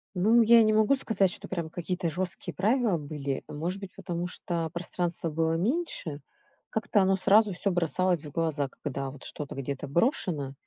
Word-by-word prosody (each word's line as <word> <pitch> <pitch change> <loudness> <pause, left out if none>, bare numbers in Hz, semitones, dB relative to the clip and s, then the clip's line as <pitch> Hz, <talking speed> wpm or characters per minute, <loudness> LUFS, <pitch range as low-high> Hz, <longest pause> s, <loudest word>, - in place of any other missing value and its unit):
Ну, 220 +6 +5
я 230 0 +7
не 215 0 +3
могу 220 +5 +4
сказать, 210 -8 +1
что - - -6
прям 170 -4 -3
какие-то 175 +1 -2
жёсткие 175 +2 -4
правила 220 -1 +2
были. 145 -2 -4
Может 175 +6 -3
быть, 195 -2 -8
потому 175 -2 -4
что 170 -2 -3
пространства 170 -1 -2
было 160 +1 0
меньше. 180 - -2 0.5
Как-то 220 -1 +1
оно 190 0 +3
сразу 205 +2 +4
всё 195 +3 0
бросалось 175 -1 +1
в 145 - -8
глаза, 155 -4 0
когда 140 -1 -3
вот 140 - -13
что-то 145 -3 -7
где-то 140 +1 -4
брошено 155 - 0
175 Hz, 170 wpm, -28 LUFS, 155-200 Hz, 0.5 s, я